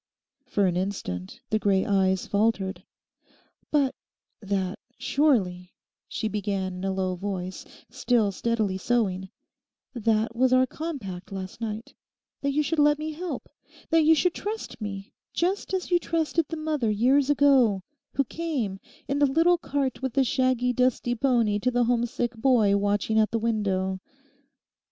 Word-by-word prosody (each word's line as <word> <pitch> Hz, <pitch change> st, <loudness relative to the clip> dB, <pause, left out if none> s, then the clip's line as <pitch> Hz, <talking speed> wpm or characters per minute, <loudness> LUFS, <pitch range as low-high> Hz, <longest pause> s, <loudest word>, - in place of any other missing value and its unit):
For 205 Hz, -, +1 dB
an 180 Hz, -2 st, +1 dB
instant 175 Hz, -, -4 dB
the 215 Hz, -, +2 dB
grey 195 Hz, -2 st, +2 dB
eyes 190 Hz, -3 st, +2 dB
faltered. 200 Hz, -2 st, 0 dB, 0.9 s
'But 280 Hz, -3 st, +2 dB, 0.5 s
that, 195 Hz, -2 st, -2 dB, 0.2 s
surely,' 190 Hz, -12 st, +1 dB, 0.3 s
she 220 Hz, -, -3 dB
began 200 Hz, -2 st, -2 dB
in 180 Hz, +1 st, -7 dB
a 195 Hz, -, 0 dB
low 190 Hz, -1 st, -1 dB
voice, 185 Hz, 0 st, -5 dB, 0.2 s
still 240 Hz, -4 st, +1 dB
steadily 210 Hz, -2 st, -1 dB
sewing, 190 Hz, -4 st, 0 dB, 0.6 s
'that 225 Hz, -1 st, 0 dB
was 255 Hz, +1 st, +3 dB
our 255 Hz, 0 st, +5 dB
compact 250 Hz, -, -6 dB
last 190 Hz, +2 st, -7 dB
night—that 230 Hz, +5 st, -7 dB
you 300 Hz, +2 st, +1 dB
should 320 Hz, +2 st, -1 dB
let 295 Hz, 0 st, +5 dB
me 310 Hz, +1 st, -4 dB
help, 345 Hz, +3 st, -5 dB, 0.4 s
that 325 Hz, 0 st, +5 dB
you 315 Hz, +1 st, +6 dB
should 350 Hz, +3 st, +2 dB
trust 425 Hz, -, -5 dB
me 200 Hz, -1 st, -6 dB, 0.2 s
just 370 Hz, +4 st, 0 dB
as 375 Hz, -1 st, -2 dB
you 350 Hz, -, +5 dB
trusted 330 Hz, -1 st, 0 dB
the 325 Hz, -, -4 dB
mother 305 Hz, -7 st, -1 dB
years 260 Hz, +7 st, +3 dB
ago 265 Hz, -9 st, +4 dB, 0.3 s
who 275 Hz, -, +3 dB
came 265 Hz, -, -3 dB, 0.3 s
in 280 Hz, +1 st, 0 dB
the 290 Hz, -, +5 dB
little 330 Hz, +5 st, +3 dB
cart 275 Hz, -6 st, -2 dB
with 265 Hz, -3 st, -2 dB
the 275 Hz, -, +3 dB
shaggy 255 Hz, -1 st, +1 dB
dusty 250 Hz, -1 st, +1 dB
pony 235 Hz, -4 st, +2 dB
to 250 Hz, -, +1 dB
the 245 Hz, 0 st, +2 dB
homesick 240 Hz, 0 st, 0 dB
boy 225 Hz, -4 st, +3 dB
watching 205 Hz, +2 st, +1 dB
at 215 Hz, -, +3 dB
the 230 Hz, -, -1 dB
window. 195 Hz, -4 st, 0 dB
230 Hz, 150 wpm, -26 LUFS, 195-280 Hz, 0.9 s, you